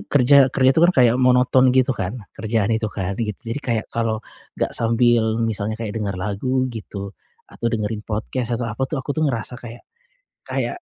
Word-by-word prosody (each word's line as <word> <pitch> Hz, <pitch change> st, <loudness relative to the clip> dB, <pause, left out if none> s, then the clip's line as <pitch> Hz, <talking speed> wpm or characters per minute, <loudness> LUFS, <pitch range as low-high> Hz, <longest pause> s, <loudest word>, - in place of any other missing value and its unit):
kerja 140 Hz, 0 st, +5 dB
kerja 130 Hz, +1 st, +3 dB
itu 160 Hz, -, +2 dB
kan 175 Hz, +1 st, +5 dB
kayak 120 Hz, -3 st, +5 dB
monoton 125 Hz, 0 st, +4 dB
gitu 130 Hz, 0 st, +4 dB
kan, 95 Hz, +2 st, -4 dB, 0.2 s
kerjaan 110 Hz, -1 st, -1 dB
itu 110 Hz, -1 st, 0 dB
kan, 100 Hz, -2 st, -3 dB
gitu. 105 Hz, -4 st, -2 dB, 0.2 s
Jadi 145 Hz, -, -4 dB
kayak, 115 Hz, -5 st, -1 dB
kalau 115 Hz, -1 st, 0 dB, 0.4 s
enggak -, -, -1 dB
sambil 115 Hz, -1 st, +2 dB
misalnya 110 Hz, -1 st, -2 dB
kayak 110 Hz, -2 st, -5 dB
denger 100 Hz, -3 st, -3 dB
lagu 105 Hz, +8 st, -1 dB
gitu 100 Hz, -2 st, -7 dB, 0.3 s
atau 115 Hz, -, -6 dB
dengerin 110 Hz, -1 st, -2 dB
podcast 115 Hz, +3 st, -3 dB
atau 120 Hz, -, -3 dB
apa 125 Hz, -, -11 dB
tuh, 155 Hz, -, -3 dB
aku 140 Hz, +1 st, -3 dB
tuh 155 Hz, -1 st, +1 dB
ngerasa 120 Hz, 0 st, -4 dB
kayak 120 Hz, 0 st, -10 dB, 0.6 s
kayak -, -, -2 dB
115 Hz, 180 wpm, -21 LUFS, 110-130 Hz, 0.6 s, kerja